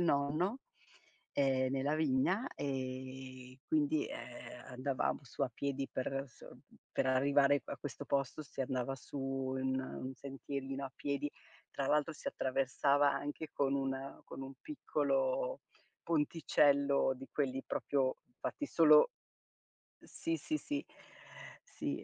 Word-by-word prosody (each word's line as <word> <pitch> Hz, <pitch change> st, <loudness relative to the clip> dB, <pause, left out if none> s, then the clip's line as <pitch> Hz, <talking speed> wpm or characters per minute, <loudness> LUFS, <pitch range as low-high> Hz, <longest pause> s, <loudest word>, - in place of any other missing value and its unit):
nonno, 165 Hz, -, +2 dB, 0.7 s
ehm, 130 Hz, -2 st, +3 dB
nella 135 Hz, +2 st, +1 dB
vigna. 160 Hz, -, +2 dB
E, 130 Hz, -1 st, -5 dB
quindi, 310 Hz, 0 st, +2 dB
ehm, 120 Hz, 0 st, -8 dB
andavamo 130 Hz, +3 st, -1 dB
su 135 Hz, +1 st, -5 dB
a 130 Hz, -, +1 dB
piedi 140 Hz, -1 st, -2 dB
per 135 Hz, +1 st, -1 dB
s 130 Hz, -, -21 dB
mhmm, -, -, -13 dB, 0.3 s
per -, -, +1 dB
arrivare 140 Hz, +2 st, +4 dB
pa -, -, -6 dB
questo 145 Hz, -5 st, -6 dB
posto 140 Hz, +2 st, 0 dB
si 140 Hz, -2 st, -4 dB
andava 130 Hz, 0 st, -1 dB
su 140 Hz, -, -8 dB
un 130 Hz, 0 st, -1 dB
un 130 Hz, 0 st, -5 dB
sentierino 135 Hz, 0 st, -4 dB
a 130 Hz, -, -12 dB
piedi, 145 Hz, 0 st, -1 dB, 0.4 s
tra 140 Hz, -, -2 dB
l'altro 150 Hz, +1 st, +2 dB
si -, -, -13 dB
attraversava 135 Hz, +2 st, +3 dB
anche 145 Hz, +2 st, -4 dB
con 140 Hz, -1 st, +2 dB
un 135 Hz, 0 st, -2 dB
con -, -, -8 dB
un 135 Hz, 0 st, -7 dB
piccolo -, -, 0 dB, 0.4 s
ponticello 145 Hz, -4 st, +3 dB
di 135 Hz, +1 st, -9 dB
quelli 135 Hz, -2 st, 0 dB
proprio 135 Hz, -2 st, +1 dB, 0.2 s
fatti 290 Hz, -, -2 dB
solo 155 Hz, -, +7 dB, 0.9 s
ehm, -, -, -18 dB
sì, 330 Hz, 0 st, -2 dB
sì, 310 Hz, -, -1 dB
sì. 290 Hz, 0 st, -3 dB, 0.8 s
Sì, -, -, -3 dB
140 Hz, 130 wpm, -35 LUFS, 130-150 Hz, 0.9 s, solo